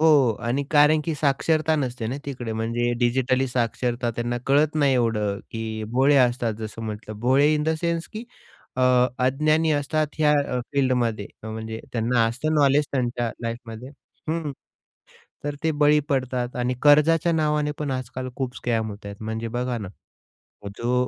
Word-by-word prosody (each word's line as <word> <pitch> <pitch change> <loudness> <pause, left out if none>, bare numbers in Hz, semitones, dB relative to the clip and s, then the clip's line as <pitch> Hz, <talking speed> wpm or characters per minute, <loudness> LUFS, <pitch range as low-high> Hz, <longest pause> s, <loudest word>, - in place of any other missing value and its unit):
हो. 145 -7 +5
आणि 120 +4 -1
कारण 150 +1 +5
की 165 -2 -1
साक्षरता 155 +2 +1
नसते 125 -5 -2
ना 130 - -3
तिकडे 125 -5 -4
म्हणजे 115 +2 -1
डिजिटली 130 +2 +1
साक्षरता 120 0 -1
त्यांना 120 +1 -2
कळत 145 +3 +3
नाही 140 -3 +3
एवढं, 105 -5 0
की 110 -1 -4
भोळे 135 +3 +4
असतात. 120 -3 +2
जसं 110 +1 -6
म्हटलं 105 -1 -6
भोळे 135 +5 +4
इन 150 - 0
द 160 +1 +1
सेन्स 170 -1 -1
की 220 +2 -6 0.5
अ, 130 - +1 0.4
अज्ञानी 155 +5 +2
असतात 150 +1 0
ह्या 150 -1 +4 0.2
अ, - - 0
फील्डमध्ये 125 -6 +1 0.2
म्हणजे 110 0 -5
त्यांना 115 0 +2
असतं 135 +7 -1
नॉलेज 145 0 +4
त्यांच्या 120 -3 -1
लाईफमध्ये. 115 +1 -6 0.4
हं. 160 -2 -2 0.9
तर 145 0 -2
ते 160 - +2
बळी 150 0 +5
पडतात. 130 -3 -1
आणि 125 +1 0
कर्जाच्या 155 +3 +5
नावाने 150 -2 +1
पण 150 -2 -2
आजकाल 130 0 -4
खूप 130 -2 -3
स्कॅम 115 -2 -1
होताहेत 100 0 -9
म्हणजे 110 +1 -3
बघा 125 +1 -2
ना, 100 -3 -6 0.9
जो 120 +1 -1
130 Hz, 155 wpm, -24 LUFS, 115-150 Hz, 0.9 s, हो